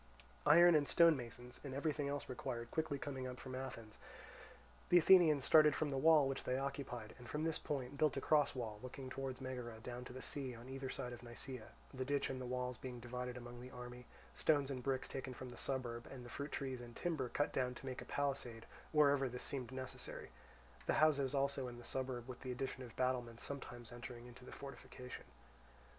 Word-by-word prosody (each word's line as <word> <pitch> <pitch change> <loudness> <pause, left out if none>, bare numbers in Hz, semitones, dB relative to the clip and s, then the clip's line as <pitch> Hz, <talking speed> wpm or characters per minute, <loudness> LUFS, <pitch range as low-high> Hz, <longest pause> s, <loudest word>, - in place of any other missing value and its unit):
Iron, 165 0 +8
stone 170 -2 +7
masons, 120 -1 -7
and 135 -2 -5
everything 145 0 0
else 145 0 -2
required 120 -2 -4
quickly 155 -3 0
coming 135 -2 -4
up 125 -1 -6
from 130 - -7
Athens, 120 -4 -6 0.9
the 175 - +8
Athenians 160 -5 +7
started 155 -2 +7
from 155 -2 0
the 135 - 0
wall 155 -2 +7
which 135 0 -2
they 125 - +1
occupied, 135 -5 -3
and 120 - -10
from 150 +1 -1
this 160 -1 0
point 140 -1 -3
built 150 -3 +3
a - - +3
cross 145 0 +4
wall 110 -4 -3
looking 130 +1 -7
towards 135 -1 -3
Megara 125 -3 -4
down 125 +1 -5
to - - -8
the 130 - -7
sea 130 -4 -2
on 120 +3 -10
either 135 0 -4
side 125 -1 -4
of 120 - -8
Nisaea; 120 0 -6 0.3
the 130 -1 -2
ditch 140 +1 +1
and 130 -1 -4
the 125 - -4
walls 125 -1 -2
being 125 -2 -6
divided 125 +1 -4
among 120 0 -8
the 125 - -8
army, 125 -1 -8 0.3
stones 145 -3 +3
and 130 -2 -3
bricks 130 0 0
taken 130 -1 -5
from 130 0 -6
the 120 - -8
suburb, 120 -3 -2
and 125 -2 -8
the - - -8
fruit 140 +4 -4
trees 130 -3 -3
and 120 -1 -10
timber 155 -8 -1
cut 145 - +1
down 125 -1 +1
to 135 - -9
make 130 -1 -4
a - - -7
palisade 135 -5 -2 0.3
wherever 145 -3 +5
this 125 +1 -5
seemed 130 -4 -3
necessary; 130 0 -6 0.6
the - - +4
houses 140 -3 +4
also 140 -1 +1
in 120 -1 -7
the 120 - -10
suburb 130 -1 -2
with 130 -2 -7
the 130 - -3
addition 130 +1 -3
of 120 -2 -8
battlements 125 -2 0
sometimes 120 -4 -6
entering 120 0 -7
into 125 +1 -11
the - - -10
fortification. 130 -2 -8
130 Hz, 210 wpm, -39 LUFS, 125-140 Hz, 0.9 s, Iron